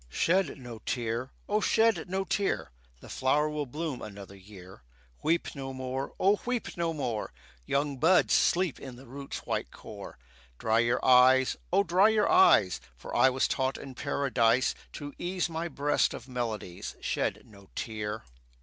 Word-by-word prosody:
Shed 170 - +1
no 120 -4 -9
tear! 120 +2 -3 0.2
O 210 +1 +2
shed 225 -4 +2
no 190 +1 -1
tear! 195 +1 -1 0.3
The - - -12
flower 145 +3 +1
will 150 -2 -3
bloom 150 0 -4
another 100 -2 -9
year. 95 -4 -14 0.4
Weep 165 +2 +1
no 135 -2 -6
more! 130 +1 -4
O 200 +2 +3
weep 245 -2 -3
no 170 -1 -1
more! 125 -8 -3 0.4
Young 140 0 0
buds 170 +7 +4
sleep 180 -4 +2
in 130 -3 -9
the 130 +2 -13
root's 135 +3 -7
white - - -2
core. - - -10 0.4
Dry 110 - +2
your 120 +1 +1
eyes! 130 0 +6 0.2
O 195 +3 +4
dry 185 +4 +4
your 220 -1 +2
eyes, 365 - +5 0.2
For - - -8
I 130 - +6
was 130 0 +1
taught 130 -1 -1
in 135 - -9
Paradise 130 -3 +1 0.2
To 145 -1 -7
ease 175 -1 -2
my 165 +1 -2
breast 145 -3 +1
of - - -10
melodies 115 -8 -4
Shed - - -2
no 100 -2 -17
tear. 110 -1 -4
135 Hz, 160 wpm, -29 LUFS, 120-170 Hz, 0.4 s, eyes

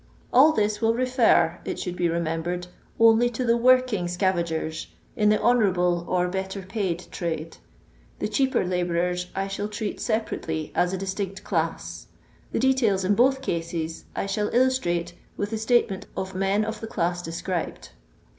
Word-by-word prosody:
All 280 +6 +7
this 210 -5 0
will 225 0 +3
refer, 235 -9 +3
it - - -4
should 180 -1 -4
be 175 -1 +1
remem 165 -1 -1
bered, 175 +1 -3 0.3
only 230 +1 +6
to 245 +1 -3
the 230 0 +4
working 250 -5 +3
scaTngers 170 -3 -1 0.3
in 210 -4 +3
the 215 - +4
hononrable 180 -8 +2
or 180 -1 +1
better 190 +1 -4
paid 185 -3 -3
trade; 165 -2 -4 0.6
the - - -2
cheaper 265 -8 +1
hbourers 180 0 -1
I 195 0 -1
shall 195 +1 -3
treat 210 0 -4
separately 165 -8 -2
as 180 - +2
a 190 - -2
distinct 195 0 -4
dass; - - -2 0.4
the - - -1
details 230 -7 +2
in 200 - +3
both 265 +4 +3
cases 165 -5 -3
I - - -1
shall 210 +1 -1
illostiate 175 -10 +1 0.2
with 205 +1 -2
the 220 - -2
statement 220 -4 +1
of 190 0 -3
men 195 +3 +1
of 220 0 -5
the 225 - -5
dui 175 -3 -1
de 165 - -5
scribed. 175 0 -4
190 Hz, 165 wpm, -25 LUFS, 175-225 Hz, 0.6 s, All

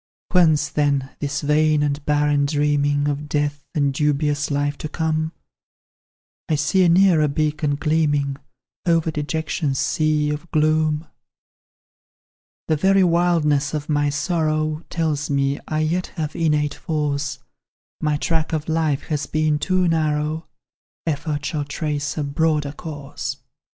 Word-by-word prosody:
"Whence, 155 -5 +4
then, 140 -2 0
this 145 0 -2
vain 150 0 +3
and 145 0 -1
barren 145 -1 +2
dreaming 145 -1 +1
Of 145 +1 -3
death, 145 -1 -1
and 140 -2 +2
dubious 145 0 0
life 145 0 0
to 155 - -5
come? 160 0 -1 1.2
I 155 - +3
see 150 +6 +2
a 175 - +5
nearer 170 -3 +5
beacon 150 0 0
gleaming 145 -2 +1 0.5
Over 165 -1 +2
dejection's 150 -2 -2
sea 155 0 +1
of 150 +3 -5
gloom. 155 0 +2 1.6
"The 155 - +2
very 195 +4 +4
wildness 165 -4 +2
of 150 0 -4
my 145 -1 +2
sorrow 155 +1 -1
Tells 155 -4 -1
me 140 0 +1
I 155 0 -1
yet 170 +4 0
have 155 -2 -3
innate 150 -3 +1
force; 145 -4 -2 0.6
My 150 -1 +1
track 160 0 -1
of 155 -1 -2
life 160 -3 0
has 150 -3 -3
been 155 -1 +1
too 185 +2 +1
narrow, 155 -1 0 0.6
Effort 150 -1 -2
shall 150 0 -1
trace 150 -1 -3
a 150 - 0
broader 150 0 0
course. 145 -2 -6
150 Hz, 130 wpm, -22 LUFS, 145-160 Hz, 1.6 s, a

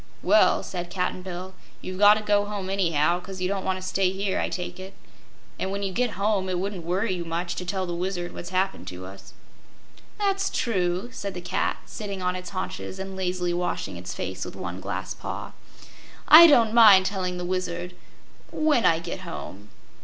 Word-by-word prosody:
"Well," - - +4
said 175 -2 -5
Cap'n 180 0 -2
Bill, 185 0 -7 0.3
"you've 185 0 -7
got 205 0 +8
to 215 - -3
go 205 -1 +2
home, 200 -2 -4
anyhow, 170 -3 +2
'cause 185 +1 -8
you 180 - 0
don't 195 0 -2
want 190 0 -1
to 185 - -6
stay 185 0 +2
here, 195 0 -1
I - - -1
take 180 0 -5
it. 190 +1 -9 0.6
And, 190 - -1
when 200 +1 -3
you 195 -1 -2
get 245 +1 0
home, 200 -2 +1
it 180 - -1
wouldn't 190 -1 -3
worry 185 +5 0
you 175 -1 -3
much 170 +1 -3
to 180 - -4
tell 190 +1 -2
the 175 - -4
Wizard 175 0 -3
what's 175 - -7
happened 190 +1 -1
to 90 0 -7
us." 100 +1 -12 0.8
"That's 395 -2 +1
true," 185 -1 -1
said 200 -5 -5
the - - -4
cat, 175 - -1
sitting 200 -3 -6
on 180 0 -1
its 180 0 -6
haunches 185 0 -5
and 190 0 -6
lazily 180 -2 -1
washing 175 0 -2
its - - -7
face - - -4
with - - -7
one - - -6
glass - - -4
paw. - - -6 0.8
"I 335 +2 +11
don't 230 -7 +5
mind 210 -5 +8
telling 185 -2 -2
the 180 - -4
Wizard 180 -1 -3 0.6
when 305 -6 +2
I 165 - +4
get 170 +2 -5
home." 105 - -8
185 Hz, 200 wpm, -25 LUFS, 180-200 Hz, 0.8 s, I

